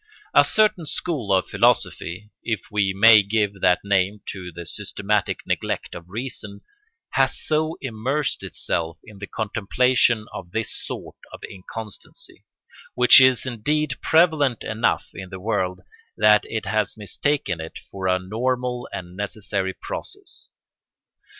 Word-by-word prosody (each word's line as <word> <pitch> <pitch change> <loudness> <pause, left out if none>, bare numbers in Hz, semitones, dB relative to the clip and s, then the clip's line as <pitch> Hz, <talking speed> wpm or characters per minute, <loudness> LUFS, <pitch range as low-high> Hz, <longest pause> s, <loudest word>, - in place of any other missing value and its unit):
A - - +7
certain 210 -7 +2
school 145 - -2
of 95 -1 +3
philosophy—if 105 +3 0
we 105 -2 +2
may 110 +3 +8
give 100 -1 -1
that 90 -1 +4
name 100 +1 +1
to 90 -2 -7
the 85 +1 -8
systematic 105 +2 -2
neglect - - -2
of 85 +1 -10
reason—has 130 - -4
so 155 +1 0
immersed 130 +4 -2
itself 80 0 -2
in 105 -2 -14
the 100 - -6
contemplation 110 +2 +1
of 85 - -8
this 115 0 -1
sort - - -7
of - - -11
inconstancy, 105 +3 -9 0.5
which 125 +2 +9
is 130 -1 +4
indeed 140 +4 0
prevalent 155 -7 +3
enough 110 +1 0
in 95 -2 -8
the 95 0 -8
world, 95 -3 -1 0.4
that 105 0 +5
it 110 -1 -4
has 105 0 0
mistaken 105 - -1
it 80 - -8
for 95 -1 -3
a 90 0 +3
normal 125 +5 -2
and 90 0 -7
necessary 100 -1 -3
process. - - -7
105 Hz, 130 wpm, -23 LUFS, 95-125 Hz, 0.5 s, which